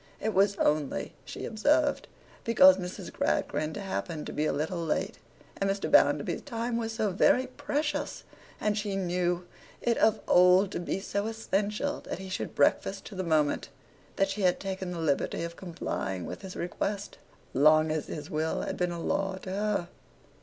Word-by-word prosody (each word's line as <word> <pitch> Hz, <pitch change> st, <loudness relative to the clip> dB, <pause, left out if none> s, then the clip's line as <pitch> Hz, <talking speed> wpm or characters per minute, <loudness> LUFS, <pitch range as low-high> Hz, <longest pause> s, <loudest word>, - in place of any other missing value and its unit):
It 220 Hz, 0 st, -1 dB
was 200 Hz, +1 st, +4 dB
only 150 Hz, -6 st, 0 dB
(she -, -, -6 dB
observed) 290 Hz, +7 st, +2 dB, 0.4 s
because 190 Hz, -5 st, +7 dB
Miss 180 Hz, 0 st, -6 dB
Gradgrind 155 Hz, +4 st, -1 dB
happened 180 Hz, -5 st, -4 dB
to -, -, -6 dB
be 155 Hz, +1 st, 0 dB
a -, -, +1 dB
little 160 Hz, +4 st, -2 dB
late, 160 Hz, -, -1 dB, 0.4 s
and 195 Hz, -, 0 dB
Mr. 195 Hz, 0 st, -1 dB
Bounderby's -, -, +4 dB
time 235 Hz, -3 st, -3 dB
was 225 Hz, -1 st, -1 dB
so 215 Hz, -2 st, 0 dB
very 245 Hz, +7 st, +4 dB
precious, 290 Hz, +3 st, -3 dB, 0.4 s
and 210 Hz, -1 st, +1 dB
she 205 Hz, -2 st, -2 dB
knew 180 Hz, -1 st, 0 dB, 0.3 s
it 235 Hz, -1 st, +1 dB
of 220 Hz, 0 st, +4 dB
old 180 Hz, +2 st, +6 dB
to -, -, -3 dB
be 175 Hz, +2 st, -2 dB
so 200 Hz, +1 st, -2 dB
essential 220 Hz, +4 st, -1 dB
that -, -, -6 dB
he 190 Hz, 0 st, -8 dB
should 185 Hz, -, -4 dB
breakfast 195 Hz, +7 st, +2 dB
to -, -, -9 dB
the 185 Hz, -1 st, -3 dB
moment, 155 Hz, -4 st, +1 dB, 0.5 s
that 195 Hz, 0 st, +1 dB
she 205 Hz, +1 st, -3 dB
had 180 Hz, -2 st, +3 dB
taken 190 Hz, -1 st, -4 dB
the 180 Hz, -, -4 dB
liberty 160 Hz, 0 st, 0 dB
of 170 Hz, 0 st, -5 dB
complying 95 Hz, -, -4 dB
with -, -, -7 dB
his 190 Hz, -2 st, -8 dB
request; 200 Hz, +3 st, -3 dB, 0.3 s
long 155 Hz, +3 st, +5 dB
as 155 Hz, -2 st, -2 dB
his 150 Hz, -, -6 dB
will 155 Hz, +1 st, -1 dB
had -, -, -4 dB
been 180 Hz, -1 st, 0 dB
a 170 Hz, -, -4 dB
law 195 Hz, +3 st, -1 dB
to 185 Hz, -, -5 dB
her. 205 Hz, -2 st, 0 dB
190 Hz, 175 wpm, -29 LUFS, 170-210 Hz, 0.5 s, because